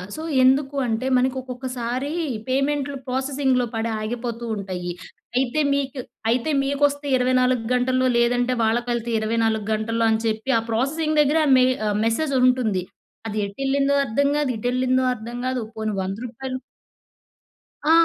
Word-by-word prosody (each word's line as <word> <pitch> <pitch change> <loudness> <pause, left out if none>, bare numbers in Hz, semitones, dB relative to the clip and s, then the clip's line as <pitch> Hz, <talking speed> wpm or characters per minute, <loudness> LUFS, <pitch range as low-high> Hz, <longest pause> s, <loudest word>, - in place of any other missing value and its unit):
So, 315 - -6 0.2
ఎందుకు 270 +2 +3
అంటే 230 +3 -1
మనకొక్కొక్కసారీ 255 +1 -2 0.3
పేమెంట్లు 275 +1 0
ప్రాసెసింగ్‌లో 265 -1 +1
పడి 225 +1 -1
ఆగిపోతూ 235 +1 -4
ఉంటయీ. 185 -3 -4 0.5
అయితే 265 +3 +1
మీకు 275 -1 -2 0.3
అయితే 245 +6 +1
మీకొస్తే 285 +1 +1
24 255 -1 +2
గంటల్లో 255 +1 +2
లేదంటే 245 +1 +2
వాళ్ళకెళితే 235 +1 0
24 220 -1 0
గంటల్లో 225 +1 0
అని 220 - +2
చెప్పి, 220 +4 -2
ఆ - - -3
ప్రాసెసింగ్ 305 +6 0
దగ్గరే 305 +2 +3
మె 255 - +5 0.2
ఆహ్, 205 0 0
మెసేజ్ 275 +6 0
ఉంటుంది. 235 -8 +2 0.4
అది 215 -1 -4
ఎటెళ్ళిందో 275 +6 0
అర్థం 275 +5 +1
కాదు, 295 -3 0
ఇటు 230 - -3
ఎళ్ళిందో 255 0 +2
అర్థం 235 +1 -7
గాదు. 255 -2 -1
పోనీ 215 -1 -2
వంద 190 +1 -4
రూపాయలు 255 +2 -5 1.3
ఆ! 315 - +4
255 Hz, 135 wpm, -23 LUFS, 230-270 Hz, 1.3 s, మె